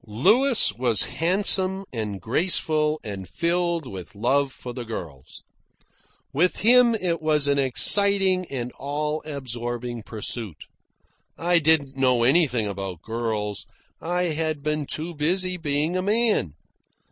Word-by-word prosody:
Louis 215 - +3
was 120 -5 +4
handsome, 190 +2 +1
and 105 -4 -4
graceful, 155 - +1
and 95 -4 -7
filled 170 -1 -1
with 95 -5 -9
love 135 +6 +1
for 125 -1 -9
the 125 0 -6
girls. 85 - -9 0.9
With 175 +6 +1
him 240 +1 +5
it 175 -6 -2
was 150 -2 +1
an 140 0 +2
exciting 190 - +3
and 125 -2 -5
all 150 +3 -2
absorbing 120 -4 -5
pursuit. 110 - -4 0.7
I 175 +1 +2
didn't 150 -3 +2
know 125 -3 +2
anything 130 -4 +2
about 95 -4 -6
girls. 110 -3 -3 0.3
I 180 +2 -1
had 155 -2 -2
been 150 -1 -2
too 165 +3 -4
busy 180 +4 -1
being 155 +1 -1
a 185 - 0
man. 210 - +1
145 Hz, 125 wpm, -24 LUFS, 120-175 Hz, 0.9 s, him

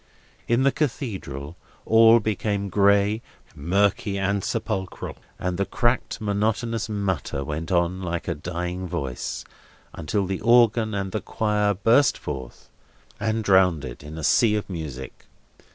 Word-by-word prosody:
In 120 +3 +2
the 140 - +4
Cathedral, 95 - -3 0.3
all 115 +1 +7
became 100 -1 -1
gray, 100 +2 +3 0.3
murky, 100 +5 +1
and 100 0 0
sepulchral, 110 -5 -3 0.2
and 90 0 -3
the 100 - +2
cracked 120 +1 0
monotonous 110 +2 -1
mutter 95 -9 -2
went 80 +5 -4
on 90 +1 +1
like 85 -2 -3
a 85 - 0
dying 90 +3 -4
voice, 65 -6 -4 0.5
until 90 +5 -1
the 95 0 -3
organ 115 -2 +4
and 100 -1 -2
the 110 - -2
choir 105 -2 0
burst 115 +8 +4
forth, 65 -2 -7 0.5
and 110 0 -1
drowned 95 -7 +4
it - - -8
in 75 +2 -9
a 80 - -6
sea 110 +7 +4
of 105 - -2
music. 70 -7 -7
100 Hz, 135 wpm, -24 LUFS, 85-110 Hz, 0.5 s, all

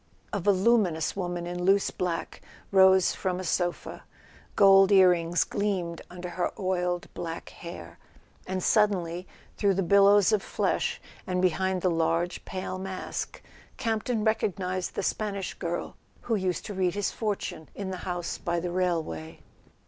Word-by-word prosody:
A 205 - 0
voluminous 190 -4 +2
woman 175 -2 -3
in 175 0 -4
loose 195 +2 +3
black 175 -2 -3 0.3
rose 190 -1 +6
from 185 -1 -2
a - - -4
sofa. 175 0 -2 0.5
Gold 195 -1 +7
ear 190 -2 +7
rings 170 0 +1
gleamed 185 -5 -2
under 180 0 -7
her 175 +1 -1
oiled 180 -3 -1
black 165 -1 -6
hair—and 170 - -9
suddenly, 185 -5 +1 0.3
through 200 -2 +2
the 195 - +1
billows 200 +2 +5
of 215 -2 +2
flesh, - - -1 0.3
and 180 0 0
behind 185 0 +1
the 185 - +3
large 165 +1 0
pale 185 0 -5
mask, 190 0 -5 0.3
Campton 225 0 -1
recog¬ 220 -3 +1
nized 185 -1 -3
the - - -3
Spanish 200 -3 -2
girl 175 -1 -4 0.3
who 235 - -2
used 185 -3 -1
to 210 - -5
read 185 -1 0
his 205 -1 -1
fortune 205 -7 -4
in 195 -2 -4
the 185 - -4
house 175 -1 -4
by 170 0 -1
the 175 +1 -3
railway. 160 - -2
185 Hz, 150 wpm, -27 LUFS, 175-195 Hz, 0.5 s, Gold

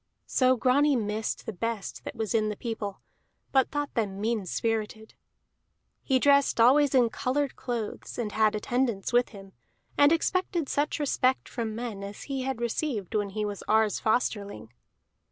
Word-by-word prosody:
So 255 0 +3
Grani 280 +4 +3
missed 215 -1 -2
the 225 - -4
best 230 +1 -4
that - - -6
was 220 -1 -2
in 215 -2 +2
the 210 - -3
people, 215 -3 -5 0.5
but 265 -2 +3
thought 290 -1 -3
them 200 -5 -2
mean 215 -2 -1
spirited. 220 +1 -2 0.9
He 265 - +2
dressed 280 -1 +3
always 270 +4 +5
in 240 -3 +4
colored 275 +3 -1
clothes, 235 -4 -5
and 225 -3 -2
had 215 0 +2
attendants 235 -1 -1
with 245 0 +3
him, 195 -2 -13 0.5
and 285 +1 +7
expected 345 -1 0
such 290 +1 0
respect 265 -3 +1
from 225 -3 -4
men 225 -4 -5
as 200 +1 -7
he 275 -2 -3
had 260 -2 -3
received 235 - -2
when 205 -1 0
he 210 +2 -3
was 205 -1 -5
Ar's 220 -1 +3
Fosterling. 205 - -1
230 Hz, 160 wpm, -28 LUFS, 210-265 Hz, 0.9 s, and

